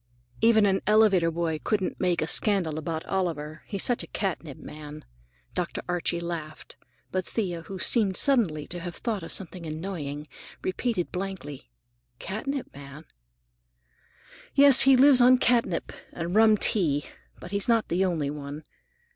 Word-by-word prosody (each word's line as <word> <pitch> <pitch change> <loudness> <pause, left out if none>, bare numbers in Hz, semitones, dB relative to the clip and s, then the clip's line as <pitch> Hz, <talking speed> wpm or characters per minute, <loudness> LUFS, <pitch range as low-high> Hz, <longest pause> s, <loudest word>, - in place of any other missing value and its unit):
"Even 220 -2 +5
an 195 -1 +1
elevator 210 -5 +4
boy 165 -1 -2
couldn't 200 -4 -1
make 175 -3 +1
a - - -3
scandal 175 -5 +1
about 160 0 -4
Oliver. 160 -5 -3
He's 200 -2 -3
such 245 - +2
a - - -6
catnip 170 -7 -4
man." 150 0 -10 0.5
Dr. 175 -1 -3
Archie 175 -1 -1
laughed, 165 -3 -7 0.4
but 185 0 -1
Thea, 180 -5 -3
who 190 +4 -8
seemed 195 0 +2
suddenly 205 - +3
to 175 - -5
have 175 0 -7
thought 225 -5 -3
of 165 - -7
something 185 -2 -4
annoying, 155 -3 -5 0.4
repeated 185 -1 -2
blankly, 180 -9 -6 0.5
"Catnip 250 - -5
man?" 140 +2 -11 1.5
"Yes, 280 -2 +8
he 265 - +7
lives 265 -1 +7
on 255 +1 +7
catnip, 235 -8 +1 0.2
and 170 +1 -4
rum 220 0 +5
tea. 155 -10 +1 0.3
But 175 - -10
he's 200 -1 -1
not 230 -2 +2
the 180 +3 +1
only 160 -6 -1
one. 145 +1 -7
180 Hz, 145 wpm, -26 LUFS, 155-210 Hz, 1.5 s, Yes